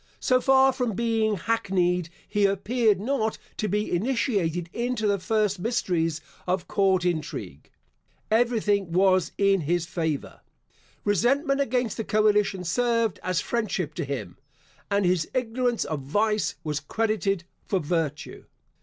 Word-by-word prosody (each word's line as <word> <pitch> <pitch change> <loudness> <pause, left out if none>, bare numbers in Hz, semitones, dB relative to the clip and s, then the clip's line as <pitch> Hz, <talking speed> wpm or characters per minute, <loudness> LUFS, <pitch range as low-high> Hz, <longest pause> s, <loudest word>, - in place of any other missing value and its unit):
So 255 0 +2
far 265 0 +5
from 250 -4 -1
being 225 0 +1
hackneyed, 180 -4 0 0.2
he 205 -1 +2
appeared 210 +2 +1
not 220 -1 -1 0.2
to 215 - -1
be 210 +2 -1
initiated 190 - 0
into 240 -2 -1
the 200 -1 +2
first 210 -1 0
mysteries 175 -8 0 0.3
of 180 0 -1
court 190 -2 +2
intrigue. 155 - -3 0.6
Everything 215 -5 +2
was 185 0 +3
in 195 -2 +3
his 170 +3 0
favour. 160 -5 -3 0.6
Resentment 275 - +2
against 250 -4 0
the 225 - -2
coalition 210 -3 +2
served 230 +3 +1
as 185 -1 0
friendship 215 -8 -2
to - - -3
him, 130 -11 -5 0.5
and 200 -1 +2
his 175 -3 +1
ignorance 245 -1 0
of 155 -2 -3
vice 210 +9 0
was 150 -2 -2
credited 200 -4 -1 0.2
for 195 - +1
virtue. 155 -2 -3
205 Hz, 130 wpm, -26 LUFS, 175-230 Hz, 0.6 s, far